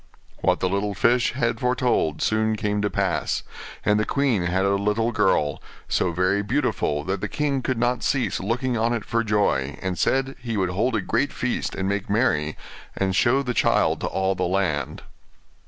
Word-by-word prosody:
What - - +1
the 95 - +2
little 100 +2 -1
fish 120 +5 +2
had 120 -2 -1
foretold 125 - +1
soon 110 0 +1
came 105 -1 -1
to 105 - 0
pass; 95 -8 -1 0.4
and 105 0 +3
the - - +2
queen 130 -10 +1
had 95 +2 +1
a 100 - +2
little 105 +4 +1
girl, 95 -9 +1 0.3
so 90 - +1
very 90 +4 +1
beautiful 75 -6 0
that 95 +3 -3
the 105 - -1
king 140 +3 -1
could 130 -1 -1
not 120 0 0
cease 135 -4 0
looking 120 +5 -1
on 115 +1 +1
it 115 -3 -3
for 115 0 0
joy, 100 - 0
and 95 -2 -3
said 135 0 +1
he 115 -3 -3
would 95 -2 +1
hold 115 +6 0
a 110 - +1
great 120 +8 0
feast 125 0 -2
and 95 - -2
make 100 0 -2
merry, 80 -9 +1 0.4
and 95 -1 0
show 130 +7 +3
the 125 -2 -2
child - - +2
to - - -1
all 95 +1 0
the 90 -1 -1
land. 85 -7 -1
105 Hz, 190 wpm, -24 LUFS, 95-120 Hz, 0.4 s, and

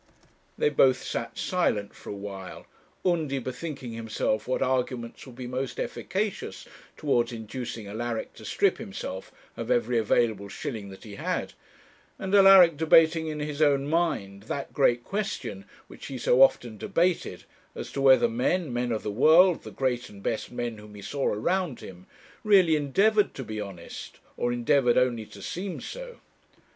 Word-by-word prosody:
They 455 - +3
both 130 - +3
sat 115 0 -4
silent 110 - 0
for - - -12
a - - -3
while, 100 -2 -8 0.4
Undy 160 -6 +1
bethinking 130 0 -5
himself 110 -1 -2
what 130 - 0
arguments 125 -2 -2
would 125 - -12
be 125 0 -7
most 130 +1 -4
efficacious 200 +2 -3 0.3
towards 120 -5 +1
inducing 115 0 -6
Alaric 110 +2 -4
to - - -14
strip - - +1
himself 95 +1 -6 0.2
of - - -6
every 120 0 +2
available 110 -2 +1
shilling 105 -1 -5
that 95 - -12
he 105 -2 -10
had; - - -2 0.6
and 190 0 -4
Alaric 195 -5 +8
debating 160 +1 +4
in 155 -1 -4
his 150 0 -4
own 140 -2 +3
mind 145 - -1
that 140 - -4
great 120 -4 +3
question 190 - -4 0.2
which - - -11
he 135 - -5
so 125 +1 +3
often 120 -5 +4
debated, 175 +1 0 0.3
as - - -6
to 140 - -3
whether 135 - +6
men, 185 - 0
men 120 0 -1
of 110 - -2
the 105 - -2
world, 160 - +5
the - - -9
great 125 -2 -2
and 100 -1 -13
best 110 - -2
men 120 -2 -4
whom 105 0 -13
he 100 - -10
saw 140 +4 -2
around 170 - 0
him, 90 -1 -11 0.4
really 190 -6 +5
endeavoured 200 +9 +2
to 135 - -5
be 110 -2 -5
honest, 95 -4 -9 0.2
or 120 - -1
endeavoured 120 +1 +2
only 120 -4 +1
to 100 - -12
seem 185 +1 -4
so. - - -8
130 Hz, 165 wpm, -27 LUFS, 110-160 Hz, 0.6 s, Alaric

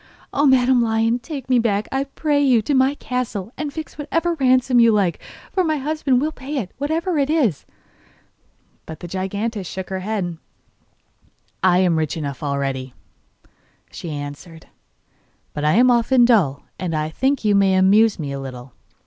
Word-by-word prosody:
'Oh, 290 +1 +3
Madam 255 -1 +4
Lion, 225 +1 +1
take 270 +1 -7
me 255 -2 +3
back, 210 -2 0
I 270 +1 -1
pray 290 +1 0
you, 245 -5 +3
to 285 - -1
my 265 +1 +3
castle; 245 -6 -4
and 300 -1 -4
fix 315 0 -8
what 295 - -5 0.3
ransom 255 -1 +3
you 230 -1 +6
like, 200 -5 +1 0.3
for 375 - +1
my 310 -2 0
husband 285 -2 0
will 305 +4 -1
pay 285 0 -6
it, 200 -8 -3
whatever 320 +3 -1
it 280 0 +1
is. 260 - 0 1.2
But 160 -1 -8
the 175 - -8
giantess 195 +3 -3
shook 190 +1 -7
her 190 - -2
head. 185 -4 -3 1.2
'I 180 -1 +4
am 180 -3 +2
rich 155 0 -2
enough 140 -4 -5
already,' 135 -3 -3 1.0
she 170 - -7
answered, 150 +3 -8 0.9
'but 150 - -4
I 150 +1 +3
am 250 +5 +5
often 240 +1 +4
dull, 185 - +2 0.2
and 175 -3 -2
I 155 0 -1
think 265 - -1
you 210 - +4
may 195 -1 +3
amuse 200 +3 +4
me 145 -5 -5
a 140 - -4
little. 130 -2 -9
220 Hz, 170 wpm, -21 LUFS, 170-265 Hz, 1.2 s, you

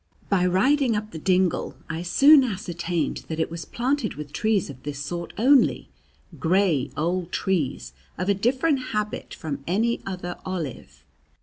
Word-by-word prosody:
By 180 -2 +3
riding 245 +7 +3
up 215 +1 -3
the 160 - -7
dingle, 185 +1 +1
I 165 0 -4
soon 275 - +6
ascertained 175 -6 -2
that 160 0 -4
it 160 - 0
was 165 -2 -6
planted 250 -1 -1
with 150 -1 -8
trees 215 0 +1
of 135 -3 -10
this 145 -1 -5
sort 170 +5 -5
only, 265 +5 +4 0.5
gray 170 -6 +2
old 175 +2 -1
trees 130 - -1 0.2
of 185 - -2
a 200 - +4
different 260 +8 +1
habit 210 0 -3
from 145 -4 -5
any 225 +7 +1
other 180 -2 -5
olive. 170 -8 -6
185 Hz, 150 wpm, -25 LUFS, 165-215 Hz, 0.5 s, soon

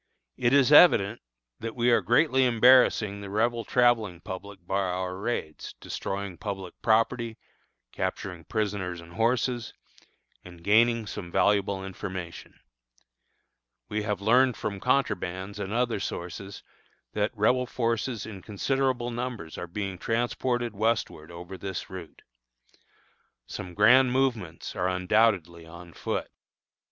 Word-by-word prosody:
It 120 -2 +1
is 140 0 +5
evident 115 - +6 0.4
that 115 0 -5
we 120 0 +2
are 115 - +4
greatly 130 +1 +3
embarrassing 120 -4 +4
the 100 - -7
Rebel 115 +3 0
travelling 115 -7 +2
public 95 +1 -9
by 95 +2 0
our 90 -1 -2
raids, 100 -6 -4
destroying 100 -2 -5
public 95 -4 -5
property, 115 +1 +1 0.5
capturing 90 -4 -4
prisoners 100 -5 -2
and 85 0 -13
horses, 120 +1 0 0.7
and 85 -2 -13
gaining 115 +3 +4
some 90 -3 -7
valuable 100 -1 +1
information. 95 -2 -7 1.3
We 105 +1 -1
have 105 -2 -2
learned 125 +4 +4
from 100 -2 -4
contrabands 100 -6 -1
and 100 -1 -4
other 120 -1 0
sources 95 +1 -6 0.5
that 105 0 +1
Rebel 125 +4 +2
forces 115 -1 -2
in 100 -4 -8
considerable 125 +4 -1
numbers 120 -9 -5
are 90 - -6
being 95 0 -5
transported 120 +1 -1
westward 105 -7 -1
over 90 +2 -9
this 95 0 -5
route. 90 -4 -10 1.2
Some 90 -1 -8
grand 125 +5 +6
movements 120 -13 -1
are 90 -2 0
undoubtedly 90 -3 +1
on 85 0 -12
foot. - - -3
105 Hz, 125 wpm, -27 LUFS, 95-120 Hz, 1.3 s, evident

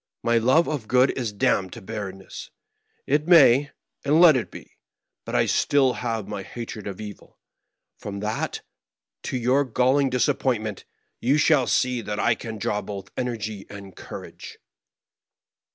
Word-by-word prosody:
My 115 0 +3
love 130 +9 +3
of 140 -8 -3
good 125 +1 +4
is 120 -5 -3
damned 95 -2 0
to - - -8
bg 105 -2 -5
rrenness; 95 0 -10 0.6
it 150 +3 +1
may, 145 -5 +6 0.3
and 150 +3 +3
let 170 -4 +8
it 125 - -2
be - - -9
1 - - -21 0.6
But - - -4
I - - +4
have - - +1
still 135 -3 +3 0.3
my 100 0 -6
hatred 115 0 -7
of 100 -2 -6
evil; 105 -2 -10 0.6
and - - -31
from 100 -1 -6
that, 105 +1 -3 0.6
to 130 - -3
your 125 +4 +2
galling 130 +2 +2
disappointment, 120 -4 -1 0.3
you 135 +5 +2
shall 150 -4 +3
see 125 -2 +1
that 105 -1 -4
I 120 - +3
can 115 0 -7
draw 105 +1 -1
both 100 -1 -8
energy 110 -5 -4
and 100 -2 -10
courage." - - -10
120 Hz, 160 wpm, -24 LUFS, 105-135 Hz, 0.6 s, let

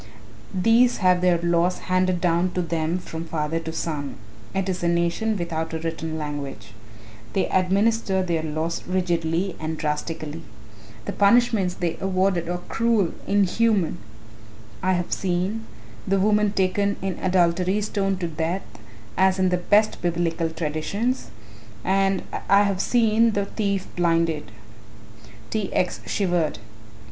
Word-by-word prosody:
These 230 +6 +4
have 180 -2 +3
their 180 -1 +4
laws 170 +1 +2
handed 185 -1 +1
down 175 +1 +1
to 180 - 0
them 165 0 -1
from 165 -2 -6
father 160 0 -2
to 160 0 -5
son 150 -4 -3 0.4
it 195 0 -1
is 185 -1 -2
a 175 - +1
nation 170 +6 +1
without 165 -2 -3
a - - 0
written 160 -1 -4
language. 140 -8 -6 0.6
They 190 - +1
administer 195 +1 +2
their 170 -3 0
laws 160 +2 -2
rigidly 175 0 0
and 160 0 -3
drastically. 155 +1 -3 0.6
The - - -2
punishments 205 -3 +3
they 170 -2 -2
award 185 -2 +1
are 175 - -1
cruel 225 -6 +1
inhuman. 200 -1 +2 0.8
I 185 0 +2
have 175 -1 -1
seen, 190 +5 -1 0.4
the 195 0 +2
woman 210 +1 +3
taken 200 +1 +1
in 190 -2 -2
adultery 180 +1 +2
stoned 195 -2 -1
to 170 - 0
death 165 +4 -2 0.5
as 190 0 +4
in 185 -1 +2
the 180 - +2
best 205 +4 +2
Biblical 170 -1 0
traditions, 165 - -2 0.5
and 195 0 +2 0.3
I 200 +1 +6
have 200 -2 0
seen 230 -1 +3
the 200 -1 0
thief 200 -2 -1
blinded." 165 -7 +1 1.0
T. 215 -3 -1
X. 180 - 0
shivered. 175 -5 0
180 Hz, 135 wpm, -24 LUFS, 165-195 Hz, 1.0 s, I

